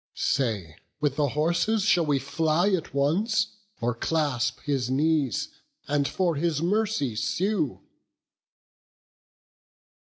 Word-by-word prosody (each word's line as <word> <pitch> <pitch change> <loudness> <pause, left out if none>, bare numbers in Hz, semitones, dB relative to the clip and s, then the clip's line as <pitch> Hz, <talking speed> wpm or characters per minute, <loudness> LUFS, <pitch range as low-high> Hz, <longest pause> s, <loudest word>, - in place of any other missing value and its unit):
Say, 105 - -1 0.2
with 145 -2 0
the 145 -1 +1
horses 170 +7 +2
shall 175 -5 +3
we 145 -2 +3
fly 160 +7 +1
at 185 -4 -1
once, 205 - +1 0.2
Or 120 +1 +1
clasp 130 -2 -1
his 135 -4 -1
knees, 145 - +1 0.4
and 145 -1 +1
for 175 -5 0
his 160 -1 0
mercy 180 - 0
sue?" 175 - -1
150 Hz, 105 wpm, -26 LUFS, 135-175 Hz, 0.4 s, shall